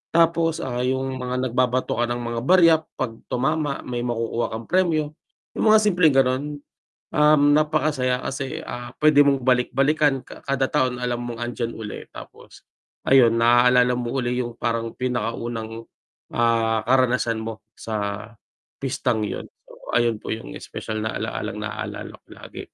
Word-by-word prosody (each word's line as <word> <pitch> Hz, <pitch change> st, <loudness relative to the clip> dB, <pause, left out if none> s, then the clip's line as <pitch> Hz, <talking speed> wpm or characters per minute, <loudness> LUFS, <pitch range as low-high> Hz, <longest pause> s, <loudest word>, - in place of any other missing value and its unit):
Tapos, 165 Hz, -1 st, +3 dB
ah, 125 Hz, -2 st, -3 dB
yung 130 Hz, +1 st, -1 dB
mga 125 Hz, 0 st, -2 dB
nagbabato 125 Hz, -1 st, 0 dB
ka 120 Hz, -, +3 dB
ng 120 Hz, 0 st, -3 dB
mga 115 Hz, 0 st, -3 dB
barya 175 Hz, -3 st, +7 dB, 0.2 s
'pag 115 Hz, -3 st, -4 dB
tumama 145 Hz, +2 st, -1 dB
may 120 Hz, -1 st, -4 dB
makukuha 120 Hz, -1 st, -1 dB
kang 110 Hz, +1 st, -5 dB
premyo, 165 Hz, -5 st, +1 dB, 0.4 s
yung -, -, -1 dB
mga 220 Hz, -, +7 dB
simpleng 175 Hz, -8 st, +3 dB
ganon. 130 Hz, +1 st, +3 dB, 0.7 s
Um, 150 Hz, -1 st, +5 dB
napakasaya 150 Hz, -5 st, +1 dB
kasi, 135 Hz, 0 st, -4 dB
ah, 120 Hz, 0 st, -6 dB
pwede 150 Hz, -1 st, +6 dB
mong 140 Hz, -2 st, +2 dB
balik-balikan 135 Hz, +2 st, +2 dB
ka -, -, -12 dB
kada 135 Hz, -1 st, +1 dB
taon 130 Hz, -4 st, +1 dB
alam 125 Hz, -1 st, -2 dB
mong 120 Hz, 0 st, -6 dB
andiyan 120 Hz, -1 st, -3 dB
uli 110 Hz, -2 st, -7 dB
tapos -, -, -13 dB, 0.4 s
ayun 125 Hz, -4 st, +6 dB
naaalala 125 Hz, +1 st, +4 dB
mo 120 Hz, -1 st, -3 dB
yung 120 Hz, -1 st, -2 dB
parang 115 Hz, -1 st, -2 dB
pinakaunang, 115 Hz, -2 st, -3 dB, 0.5 s
ah, 115 Hz, -1 st, +2 dB
karanasan 125 Hz, -3 st, +2 dB
mo 110 Hz, 0 st, -6 dB
sa 105 Hz, -1 st, -4 dB, 0.6 s
pistang 125 Hz, -4 st, -1 dB
yun. -, -, -5 dB, 0.2 s
So, -, -, -14 dB, 0.2 s
ayun 120 Hz, -2 st, +2 dB
po -, -, -6 dB
yung 115 Hz, -, -9 dB
espesyal 110 Hz, -1 st, -5 dB
na 110 Hz, -, -3 dB
alalang -, -, -4 dB
naalala -, -, -6 dB
ko -, -, -60 dB
lagi. -, -, -11 dB
125 Hz, 150 wpm, -23 LUFS, 115-140 Hz, 0.7 s, barya